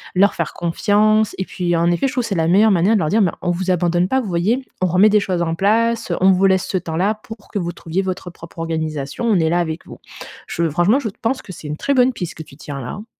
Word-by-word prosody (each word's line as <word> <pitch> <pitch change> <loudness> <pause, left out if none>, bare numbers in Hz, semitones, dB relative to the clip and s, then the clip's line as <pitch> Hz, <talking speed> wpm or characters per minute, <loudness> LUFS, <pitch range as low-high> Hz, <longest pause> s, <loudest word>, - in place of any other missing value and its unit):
leur 195 +2 +4
faire 170 - -3
confiance 210 +5 +1
et 190 - -2
puis, 175 -2 -2
en 170 +1 +2
effet, 175 +11 +1
je 260 - -4
trouve 250 -1 0
c'est 220 -4 -3
la 160 -2 +1
meilleure 205 +5 +5
manière 190 +4 +3
de 210 - +2
leur 155 - 0
dire 220 +5 +3
«Mais 180 -5 +3
on 175 - +1
vous 185 +2 -3
abandonne 175 0 +1
pas 265 +6 +1
vous 245 - -4
voyez? 200 +9 0 0.2
On 185 - +3
remet 185 +5 +5
des 210 0 +4
choses 185 -3 -2
en 165 -1 -1
place, 225 +3 +1
on 190 +1 +6
vous 190 +1 +3
laisse 190 -1 +2
ce 190 - -1
temps-là 180 +4 -1
pour 225 -2 -11
que 205 - -2
vous 175 -2 -3
trouviez 170 +2 -3
votre 185 -1 -4
propre 170 0 -14
organisation, 160 +1 -3
on 225 -3 +3
est 160 -1 +2
là 175 - +1
avec 160 -1 -3
vous». - - -12 0.5
Je 170 0 -1
franchement, 175 - +2
je 235 - -3
pense 255 +3 -1
que - - -10
c'est 155 - -10
une 150 +1 -4
très 280 - 0
bonne 255 -1 +3
piste 175 -7 -5
que 160 - -8
tu 140 - -16
tiens 145 -2 -7
là, 125 - -7
hein. 210 - -8
185 Hz, 275 wpm, -19 LUFS, 170-215 Hz, 0.5 s, on